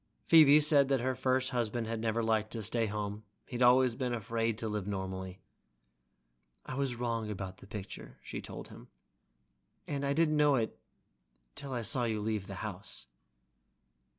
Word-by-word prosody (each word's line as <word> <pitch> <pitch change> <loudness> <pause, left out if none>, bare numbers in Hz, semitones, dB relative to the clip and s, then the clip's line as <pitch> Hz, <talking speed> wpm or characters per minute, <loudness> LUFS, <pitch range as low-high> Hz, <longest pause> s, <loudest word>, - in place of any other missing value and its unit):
Phoebe 155 -3 +8
said 145 -2 +5
that 135 -3 +1
her 130 +1 0
first 130 0 0
husband 120 -1 -1
had 115 0 -3
never 115 +1 0
liked 110 -1 +1
to 115 -2 -4
stay 115 +2 0
home, 105 0 -4 0.2
he'd 125 0 -5
always 125 0 +5
been 125 0 -2
afraid 115 0 -1
to 115 - -3
live 105 -2 -3
normally. 95 -1 -5 1.2
"I - - -6
was 135 -2 -1
wrong 115 -2 -2
about 95 -2 -5
the - - -15
picture," 105 -2 -8
she - - -6
told - - -8
him, - - -13 1.0
"and 140 -1 -3
I 140 0 +1
didn't 155 0 +2
know 140 -6 +4 0.9
till 135 - -5
I 120 -2 -2
saw 120 +3 +4
you 110 -2 -1
leave 105 -2 -2
the 95 - -6
house." 100 - -6
115 Hz, 165 wpm, -32 LUFS, 105-130 Hz, 1.2 s, Phoebe